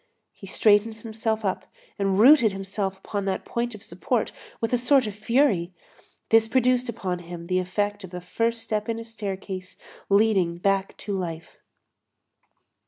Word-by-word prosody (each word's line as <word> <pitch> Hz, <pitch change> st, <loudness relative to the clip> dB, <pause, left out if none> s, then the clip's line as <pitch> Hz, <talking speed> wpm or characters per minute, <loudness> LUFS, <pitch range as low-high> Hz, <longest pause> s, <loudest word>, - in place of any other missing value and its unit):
He 195 Hz, -, -12 dB
straightened 210 Hz, +3 st, +3 dB
himself 220 Hz, 0 st, -3 dB
up, 190 Hz, -, -2 dB, 0.3 s
and 195 Hz, -1 st, +1 dB
rooted 240 Hz, -2 st, +7 dB
himself 195 Hz, 0 st, -3 dB
upon 200 Hz, +1 st, -4 dB
that 190 Hz, -1 st, -2 dB
point 235 Hz, -1 st, -2 dB
of 210 Hz, -, -10 dB
support 225 Hz, -, -1 dB, 0.3 s
with 225 Hz, -1 st, -2 dB
a -, -, +5 dB
sort 260 Hz, +1 st, +4 dB
of 210 Hz, -, -4 dB
fury. 210 Hz, -5 st, +1 dB, 0.5 s
This 225 Hz, 0 st, +5 dB
produced 250 Hz, +1 st, +2 dB
upon 190 Hz, -6 st, -3 dB
him 170 Hz, -1 st, -8 dB
the 185 Hz, +1 st, +1 dB
effect 205 Hz, +3 st, -2 dB
of 190 Hz, -, -8 dB
the 180 Hz, 0 st, -6 dB
first 230 Hz, +6 st, -1 dB
step 215 Hz, 0 st, -2 dB
in 225 Hz, -, -1 dB
a 230 Hz, -, -5 dB
staircase 195 Hz, -4 st, -6 dB, 0.3 s
leading 195 Hz, -4 st, +3 dB
back 195 Hz, +1 st, 0 dB
to 205 Hz, -, -4 dB
life. 170 Hz, -3 st, -5 dB
205 Hz, 160 wpm, -25 LUFS, 190-225 Hz, 0.5 s, rooted